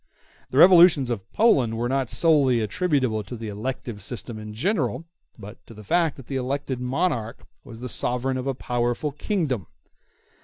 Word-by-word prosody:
The 130 Hz, -, -3 dB
revolutions 170 Hz, -6 st, +7 dB
of 100 Hz, -5 st, -5 dB
Poland 130 Hz, -, +3 dB
were 120 Hz, +1 st, -1 dB
not 135 Hz, -1 st, -1 dB
solely 135 Hz, 0 st, +3 dB
attributable 130 Hz, -, 0 dB
to 105 Hz, +5 st, -8 dB
the 110 Hz, -2 st, -6 dB
elective 115 Hz, 0 st, -5 dB
system 110 Hz, +1 st, -6 dB
in 105 Hz, 0 st, -8 dB
general, 140 Hz, -, -1 dB, 0.3 s
but 105 Hz, +1 st, -12 dB
to 115 Hz, -, -13 dB
the 105 Hz, -, -11 dB
fact 165 Hz, -, +1 dB
that 135 Hz, -, -11 dB
the 135 Hz, -, -4 dB
elected 130 Hz, 0 st, -3 dB
monarch 125 Hz, -3 st, -2 dB, 0.2 s
was 115 Hz, 0 st, -12 dB
the 125 Hz, -, -4 dB
sovereign 125 Hz, +2 st, -1 dB
of 130 Hz, +1 st, -4 dB
a 135 Hz, -, -1 dB
powerful 120 Hz, +4 st, -2 dB
kingdom. 145 Hz, -, -2 dB
125 Hz, 165 wpm, -24 LUFS, 115-140 Hz, 0.3 s, revolutions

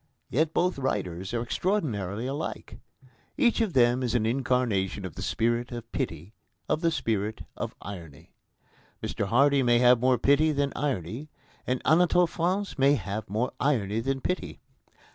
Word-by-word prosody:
Yet 155 Hz, +5 st, +2 dB
both 175 Hz, -2 st, +1 dB
writers 95 Hz, -8 st, -2 dB
are 120 Hz, -1 st, -1 dB
extraordinarily 120 Hz, -, -1 dB
alike. 140 Hz, +4 st, -5 dB, 0.6 s
Each 240 Hz, -5 st, +3 dB
of 215 Hz, -6 st, 0 dB
them 120 Hz, 0 st, +4 dB
is 125 Hz, -2 st, -1 dB
an 110 Hz, -3 st, +2 dB
incarnation 115 Hz, -6 st, 0 dB
of 90 Hz, -, -6 dB
the -, -, -8 dB
spirit 120 Hz, +2 st, 0 dB
of 120 Hz, -1 st, -7 dB
pity, 95 Hz, -, -4 dB, 0.3 s
of 155 Hz, -, 0 dB
the 165 Hz, -, +3 dB
spirit 110 Hz, -8 st, -2 dB
of -, -, -5 dB
irony. 85 Hz, -7 st, -10 dB, 0.7 s
Mr 100 Hz, -, -2 dB
Hardy 140 Hz, +5 st, +4 dB
may 120 Hz, -2 st, +4 dB
have 125 Hz, 0 st, +5 dB
more 130 Hz, +1 st, +3 dB
pity 145 Hz, +6 st, +3 dB
than 140 Hz, -1 st, 0 dB
irony 135 Hz, -, -3 dB, 0.4 s
and 125 Hz, 0 st, -1 dB
Anatole 175 Hz, +2 st, +4 dB
France 180 Hz, +1 st, -2 dB
may 140 Hz, +2 st, +5 dB
have 105 Hz, -1 st, -4 dB
more 110 Hz, +5 st, -1 dB
irony 115 Hz, -7 st, +1 dB
than 135 Hz, +3 st, -2 dB
pity. 180 Hz, -, -3 dB
125 Hz, 155 wpm, -27 LUFS, 110-145 Hz, 0.7 s, have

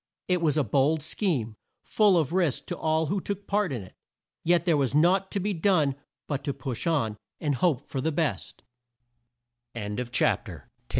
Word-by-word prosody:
It 180 Hz, -2 st, +1 dB
was 155 Hz, -3 st, +2 dB
a 150 Hz, -, +3 dB
bold 140 Hz, +6 st, +2 dB
scheme, 140 Hz, -, -1 dB, 0.3 s
full 205 Hz, -4 st, +3 dB
of 160 Hz, -1 st, 0 dB
risk 175 Hz, -8 st, +1 dB
to 175 Hz, -, -4 dB
all 160 Hz, 0 st, +1 dB
who 195 Hz, +5 st, -1 dB
took 200 Hz, +1 st, -5 dB
part 205 Hz, -4 st, 0 dB
in 120 Hz, -6 st, -4 dB
it, 95 Hz, -, -14 dB, 0.5 s
yet 175 Hz, +1 st, +3 dB
there 170 Hz, -3 st, +4 dB
was 140 Hz, -2 st, 0 dB
naught 185 Hz, +5 st, +3 dB
to 200 Hz, -, -2 dB
be 205 Hz, +2 st, -1 dB
done 160 Hz, -5 st, +2 dB, 0.3 s
but 145 Hz, -3 st, -3 dB
to 140 Hz, -, -2 dB
push 130 Hz, +2 st, -4 dB
on, 115 Hz, -10 st, 0 dB, 0.2 s
and 150 Hz, -2 st, 0 dB
hope 140 Hz, 0 st, +1 dB
for 135 Hz, -, -3 dB
the 160 Hz, -, 0 dB
best. 145 Hz, -, -2 dB
160 Hz, 170 wpm, -27 LUFS, 135-180 Hz, 0.5 s, there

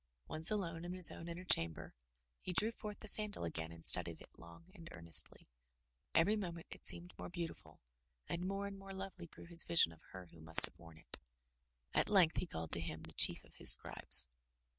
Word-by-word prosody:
Once 160 Hz, +1 st, +5 dB
alone 170 Hz, -6 st, -4 dB
in 175 Hz, +1 st, -7 dB
his 185 Hz, -2 st, +2 dB
own 165 Hz, -, -11 dB
inner 170 Hz, +2 st, -9 dB
chamber, 85 Hz, -, -1 dB, 0.5 s
he -, -, -7 dB
drew 215 Hz, +5 st, +2 dB
forth 210 Hz, -2 st, -10 dB
the 215 Hz, -, -8 dB
sandal 210 Hz, -, +4 dB
again 80 Hz, -1 st, -6 dB
and 80 Hz, 0 st, -13 dB
studied -, -, +2 dB
it -, -, -14 dB
long 85 Hz, -, -16 dB
and 170 Hz, -4 st, -14 dB
earnestly. 85 Hz, -1 st, +1 dB, 0.7 s
Every 200 Hz, +6 st, +2 dB
moment 170 Hz, -5 st, -7 dB
it -, -, -6 dB
seemed 175 Hz, +1 st, +1 dB
more -, -, -8 dB
beautiful; 170 Hz, -2 st, -9 dB, 0.5 s
and 175 Hz, +2 st, -5 dB
more 195 Hz, +1 st, -5 dB
and 200 Hz, -1 st, -9 dB
more 195 Hz, 0 st, -12 dB
lovely 190 Hz, -2 st, -9 dB
grew -, -, -15 dB
his 170 Hz, 0 st, +6 dB
vision 165 Hz, -, +2 dB
of 80 Hz, -, -19 dB
her 95 Hz, -1 st, -12 dB
who 80 Hz, -, -17 dB
must 80 Hz, +1 st, +4 dB
have -, -, -10 dB
worn 80 Hz, -1 st, -16 dB
it. 80 Hz, -, -13 dB, 0.7 s
At -, -, -1 dB
length 180 Hz, -5 st, +2 dB
he 180 Hz, -, -3 dB
called 80 Hz, -, -8 dB
to 85 Hz, -, -1 dB
him 80 Hz, -1 st, -7 dB
the -, -, -11 dB
Chief -, -, +3 dB
of -, -, -21 dB
his -, -, +5 dB
Scribes. 65 Hz, 0 st, +4 dB
170 Hz, 205 wpm, -35 LUFS, -, 0.7 s, his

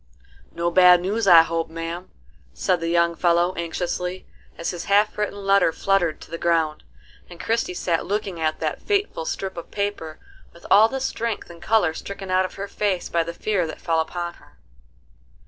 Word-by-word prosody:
"No 170 Hz, 0 st, -1 dB
bad 180 Hz, 0 st, +7 dB
news 200 Hz, +4 st, -1 dB
I 170 Hz, -3 st, +9 dB
hope, 165 Hz, 0 st, -2 dB
ma'am?" 165 Hz, +2 st, -6 dB, 0.5 s
said 180 Hz, -, +1 dB
the 165 Hz, -, -3 dB
young 170 Hz, 0 st, +2 dB
fellow 175 Hz, +1 st, +2 dB
anxiously, 180 Hz, +2 st, -3 dB, 0.3 s
as 170 Hz, -, -2 dB
his 175 Hz, -2 st, -6 dB
half 205 Hz, +2 st, +3 dB
written 205 Hz, -1 st, -3 dB
letter 195 Hz, -3 st, +4 dB
fluttered 185 Hz, -3 st, 0 dB
to -, -, -13 dB
the 165 Hz, -, -5 dB
ground, 160 Hz, -3 st, 0 dB, 0.5 s
and 175 Hz, -1 st, -12 dB
Christie 225 Hz, -5 st, -1 dB
sat 170 Hz, -2 st, -1 dB
looking 200 Hz, -3 st, -2 dB
at 155 Hz, -1 st, -1 dB
that -, -, -2 dB
fateful 405 Hz, -, -1 dB
strip 190 Hz, +1 st, -4 dB
of 170 Hz, -, -7 dB
paper 200 Hz, -6 st, -4 dB, 0.4 s
with 170 Hz, -, -17 dB
all 215 Hz, +3 st, +7 dB
the 270 Hz, -, -3 dB
strength 230 Hz, -7 st, -3 dB
and 170 Hz, -1 st, -14 dB
color 215 Hz, -8 st, +2 dB
stricken 195 Hz, +2 st, -7 dB
out 185 Hz, 0 st, +3 dB
of -, -, -8 dB
her 200 Hz, +1 st, -5 dB
face 200 Hz, -2 st, -2 dB
by 170 Hz, -, +1 dB
the 170 Hz, -, -5 dB
fear 195 Hz, -5 st, 0 dB
that 155 Hz, -, -8 dB
fell 165 Hz, -1 st, 0 dB
upon 170 Hz, +2 st, -3 dB
her. -, -, -22 dB
175 Hz, 185 wpm, -23 LUFS, 170-200 Hz, 0.5 s, I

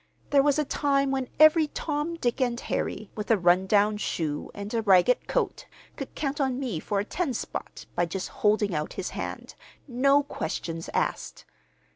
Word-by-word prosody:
"There 280 Hz, -1 st, +6 dB
was 290 Hz, 0 st, +2 dB
a 300 Hz, -, +1 dB
time 275 Hz, -1 st, +1 dB
when 265 Hz, -2 st, -2 dB
every 310 Hz, 0 st, +7 dB
Tom, 300 Hz, +2 st, -3 dB
Dick, 250 Hz, -4 st, -1 dB
and 240 Hz, -2 st, +1 dB
Harry, 215 Hz, 0 st, -3 dB
with 210 Hz, -1 st, -6 dB
a 225 Hz, -, +5 dB
run 180 Hz, +1 st, +3 dB
down 210 Hz, +1 st, +3 dB
shoe 155 Hz, -7 st, -3 dB
and 205 Hz, +2 st, -6 dB
a 230 Hz, -, +1 dB
ragged 200 Hz, +3 st, +4 dB
coat, -, -, -1 dB, 0.3 s
could -, -, -7 dB
count 285 Hz, 0 st, -2 dB
on 260 Hz, -1 st, 0 dB
me 240 Hz, -, -2 dB
for 200 Hz, +5 st, -1 dB
a 200 Hz, -, -1 dB
ten 300 Hz, -1 st, -2 dB
spot -, -, -6 dB
by 175 Hz, 0 st, +1 dB
just 185 Hz, +3 st, -4 dB
holding 210 Hz, -2 st, +3 dB
out 150 Hz, -1 st, -2 dB
his 190 Hz, -, -4 dB
hand, -, -, -6 dB, 0.3 s
no 275 Hz, +3 st, +3 dB
questions 165 Hz, -, -4 dB
asked. -, -, -2 dB
235 Hz, 180 wpm, -27 LUFS, 195-275 Hz, 0.3 s, every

